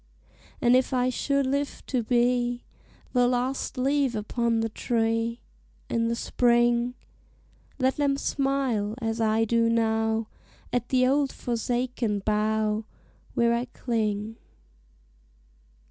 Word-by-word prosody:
And 245 +1 +5
if 255 +1 +2
I 250 0 +2
should 280 +2 0
live 280 +2 -2
to 255 -3 0
be 245 +1 +1 0.5
The 245 -1 +4
last 255 +2 -1
leaf 270 -1 +1
upon 230 +2 0
the 225 - -1
tree 230 +1 -1 0.5
In 230 0 +1
the 230 - 0
spring, 240 0 +2 0.8
Let 260 0 +1
them 280 -1 +1
smile, 270 -7 0
as 225 -1 -2
I 220 0 +2
do 230 +1 +2
now, 225 -1 +1 0.5
At 245 -1 -1
the 255 -1 +3
old 275 +1 +2
forsaken 240 -2 -2
bough 215 0 +1 0.5
Where 235 0 +3
I 235 +1 0
cling. 220 -3 -2
240 Hz, 115 wpm, -26 LUFS, 225-255 Hz, 0.8 s, And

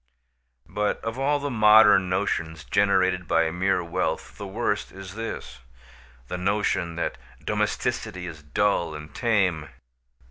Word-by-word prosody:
But 105 0 -1
of 115 +3 -4
all 145 +2 +2
the 145 0 -3
modern 105 -4 +6
notions 80 -4 -1
generated 95 +3 +2
by 80 -1 +2
mere 90 +1 +1
wealth 85 - -3
the - - -7
worst - - -2
is 95 -1 -9
this: 105 - -6 0.7
the 90 - -4
notion 95 -3 0
that 85 - -3 0.3
domesticity 90 -1 -2
is 80 -3 -8
dull 85 +1 0
and 75 +1 -9
tame. 95 - +1
95 Hz, 130 wpm, -25 LUFS, 85-105 Hz, 0.7 s, modern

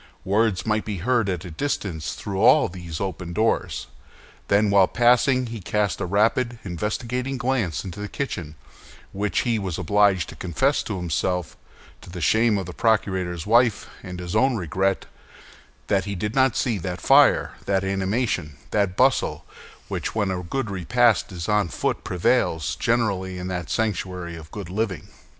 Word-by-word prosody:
Words 100 0 +1
might 110 -1 +1
be 105 -2 -4
heard 115 +2 +1
at 90 -1 -3
a 90 - -7
distance 85 - -3
through 100 -2 -4
all 145 +6 +6
these 85 -3 -7
open 90 -3 -4
doors. 110 +4 0 0.6
Then, 100 +1 +3
while 100 -2 +6
passing, 125 +3 +3
he 115 -1 -6
had 95 - -12
cast 105 0 0
a - - -1
rapid, 115 +5 +1
investigating 120 +8 -3
glance 120 - -1
into 95 +1 -7
the 105 - -4
kitchen; 85 - -4 0.6
and 100 -2 -2
he 115 -2 +1
was 95 -5 -3
obliged 100 -1 +2
to - - -9
confess 130 - 0
to 105 - -4
himself, 90 0 -2 0.5
to - - -13
the 90 0 -7
shame 110 +6 +3
of 95 - -3
the 90 - -8
procurator's 95 -3 0
wife 115 0 +3 0.2
and 90 -2 -7
his 90 +2 -5
own 130 +3 +3
regret, 95 0 -1 0.8
that 95 -2 +1
he 100 -1 -3
did 105 +4 -3
not 130 -1 +3
see 115 -6 0
that 90 0 -4
fire, - - +5
that 95 -1 +1
animation, 95 - -1
that 100 -3 0
bustle, 130 +1 +2 0.4
which - - -4
when 100 -3 +1
a 90 -1 -2
good 110 +5 -3
repast 115 +5 +2
is 85 -3 -5
on 105 -3 +2
foot - - -2
prevails 80 -2 +1
generally 100 -6 0
in 90 0 -5
that 90 -2 -4
sanctuary 90 -5 -2
of 80 -1 -11
good 100 -4 -7
living. 100 -2 -2
100 Hz, 170 wpm, -24 LUFS, 90-115 Hz, 0.8 s, all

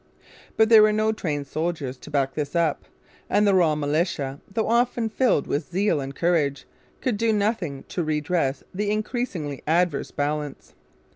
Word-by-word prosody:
But 220 0 +5
there 225 -2 +9
were 215 0 +5
no 215 +1 +2
trained 150 -9 -3
soldiers 155 -3 -3
to - - -11
back 140 -2 0
this 150 +1 -4
up; 165 -3 +1 0.4
and 210 - +3
the 200 - +4
raw 170 -5 +4
militia, 145 -2 -1
though 220 +2 -1
often 235 0 +1
filled 240 - +2
with 145 +1 -2
zeal 180 -4 +1
and 135 +1 -6
courage, 155 -5 +1 0.4
could 245 -5 0
do 225 +1 +2
nothing 200 - -1
to 175 - -2
redress 150 -2 -1
the 205 +2 -1
increasingly 210 - -3
adverse 165 -2 +1
balance. 145 0 -3
170 Hz, 160 wpm, -24 LUFS, 145-210 Hz, 0.4 s, there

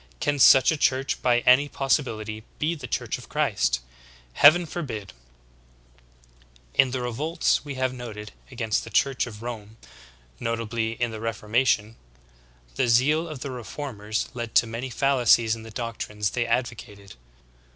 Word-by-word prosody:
Can 145 0 0
such 135 +2 +7
a 160 - -1
church 135 -1 0
by 120 -1 +3
any 135 +4 +5
possibiHty 110 -7 -1 0.2
be 155 +3 0
the 160 - -8
Church - - -3
of - - -14
Christ? - - 0 0.5
Heaven 170 - +6
forbid! 130 - -6 1.6
15. - - -33
In 135 - +4
the 125 0 -3
revolts 150 +8 0
v/e 140 -1 -8
have 130 -1 -1
noted 110 -4 -8 0.2
against 115 -4 -1
the - - -9
Church 135 -4 +1
of 110 -1 -10
Rome, 110 -2 -7 0.6
notably 115 -1 -2
in 120 0 -2
the 110 - -7
Reformation, 115 0 0 0.8
the - - +2
zeal 145 +8 +3
of 155 -5 -8
the 140 - -5
reformers 115 -4 -4
led 120 -2 -6
to - - +6
many 115 +3 -5
fallacies 120 -3 +3
in 115 - -10
the 115 - -10
doctrines 105 -3 -4
they 120 -1 -1
advocated. 105 -4 -3
120 Hz, 150 wpm, -25 LUFS, 110-135 Hz, 1.6 s, such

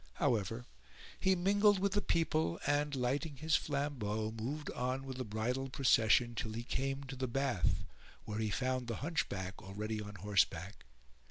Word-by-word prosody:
However, 115 - 0 0.5
he 190 0 +4
mingled 200 +3 +4
with 195 +1 +1
the 205 - +1
people 160 - +1
and, 145 0 +1
lighting 140 +4 -1
his 155 +3 +1
flambeau, 120 -7 -1
moved 130 +7 -4
on 130 +2 -2
with 130 -1 -5
the 130 - -2
bridal 125 +5 -2
procession 120 -2 +4
till 110 -1 -3
he 115 +2 -4
came 135 +2 -2
to 135 0 -7
the 130 0 -2
bath 130 -6 +1 0.4
where 105 0 -3
he 110 -1 0
found 130 +2 -1
the 115 - -2
Hunchback 95 - -2
already 105 +2 -4
on 105 0 -7
horseback. 100 -3 0
125 Hz, 160 wpm, -35 LUFS, 110-145 Hz, 0.5 s, he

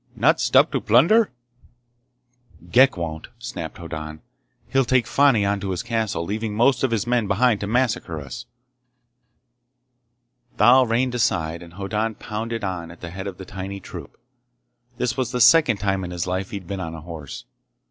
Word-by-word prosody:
"Not - - +3
stop - - +4
to - - -1
plunder?" 170 - +4 1.4
"Ghek 130 0 +5
won't!" 80 -2 -5
snapped 115 -9 -7
Hoddan. 80 -2 -7 0.5
"He'll 135 0 +2
take 125 -1 +2
Fani 135 -6 +3
on 100 0 0
to 100 - -4
his 90 -2 -2
castle, 110 -7 -2
leaving 105 +2 -3
most 125 +5 +3
of 130 - +3
his 115 -2 -1
men 120 -3 +1
behind 110 +2 +2
to 100 - -4
massacre 110 -8 0
us!" 70 -4 -8 2.1
Thal 125 +4 +6
reined 125 +2 +1
aside 85 -8 0
and 85 -1 -12
Hoddan 105 +3 -2
pounded 115 +1 -5
on 90 -4 -4
at 85 - -14
the 85 - -7
head 95 +2 -6
of 95 -2 -6
the 95 - -9
tiny 100 +1 -6
troop. - - -10 0.8
This 120 -1 -1
was 130 -3 -2
the 125 - -2
second 125 -1 +6
time 95 -1 -1
in 90 - -5
his 90 -1 -3
life 95 +1 -3
he'd 100 -3 -7
been 100 +2 -5
on 80 -3 -5
a 80 - -9
horse. 80 -3 -9
100 Hz, 170 wpm, -23 LUFS, 90-120 Hz, 2.1 s, Thal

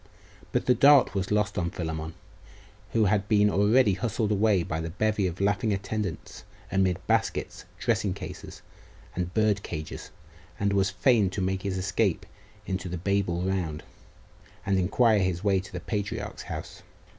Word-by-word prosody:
But - - 0
the 125 - +5
dart 140 +3 +6
was 95 -1 -2
lost 105 -1 +1
on 85 -1 -1
Philammon, 80 -1 -5 0.8
who 110 -2 +3
had 100 +1 +1
been 105 -1 +4
already 105 +2 +4
hustled 110 +1 -1
away 105 -3 +3
by 80 0 -3
the 80 - -4
bevy 105 +2 0
of 90 0 -6
laughing 100 +2 +1
attendants, 100 -3 -4 0.3
amid 95 -2 +2
baskets, - - -1
dressing - - 0
cases, - - -9 0.5
and 90 0 -2
bird 110 -2 +2
cages, 80 -4 -6 0.5
and 100 0 +1
was 100 0 +2
fain 105 +1 +3
to 95 - -5
make 95 0 -1
his 95 -1 -2
escape 90 0 0 0.4
into 95 -1 -3
the 90 - -3
Babel 95 -1 0
round, 90 -5 -2 0.8
and 95 -1 +2
inquire 105 +4 +3
his 95 -1 -1
way 100 -2 +3
to 95 +1 -9
the 90 - -5
patriarch's 100 +3 -4
house. - - -7
95 Hz, 155 wpm, -27 LUFS, 90-105 Hz, 0.8 s, dart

